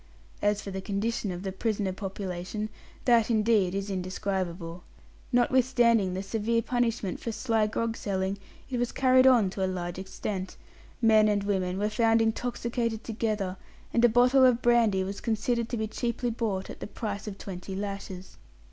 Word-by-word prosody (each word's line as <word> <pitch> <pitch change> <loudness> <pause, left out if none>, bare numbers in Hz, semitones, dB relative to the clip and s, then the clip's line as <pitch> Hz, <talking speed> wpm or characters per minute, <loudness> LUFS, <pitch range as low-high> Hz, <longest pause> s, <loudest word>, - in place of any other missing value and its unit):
As 205 0 +1
for 200 - -6
the 190 0 -4
condition 205 +1 -2
of 180 +1 -6
the 190 - -2
prisoner 200 -1 -1
population, 195 +1 -4 0.4
that, 235 -2 +4
indeed, 215 -4 +3
is 195 +1 -3
indescribable. 185 -2 -3 0.5
Notwithstanding 240 -5 +3
the 190 - -3
severe 225 +3 0
punishment 235 -6 -1
for 230 - -4
sly 220 -1 +1
grog 225 +1 -2
selling, 195 -1 -2 0.3
it 250 - -1
was 245 0 0
carried 260 0 +5
on 230 -8 +5
to 195 - -3
a - - +2
large 175 -1 -4
extent. 190 0 -5 0.5
Men 220 -1 +6
and 205 -1 +1
women 190 -2 -1
were 205 +1 +1
found 225 +1 +3
intoxicated 230 0 -1
together, 215 -4 -2 0.4
and 235 - +3
a 240 - +7
bottle 250 +3 +5
of 250 -2 +4
brandy 230 -5 +4
was 195 +1 -5
considered 230 +1 0
to 240 - -2
be 220 - -1
cheaply 235 +2 -2
bought 215 -5 -2
at - - -10
the - - -5
price 210 -1 -5
of 200 -2 -5
twenty 190 0 -7
lashes. 195 -2 -6
210 Hz, 165 wpm, -28 LUFS, 190-235 Hz, 0.5 s, a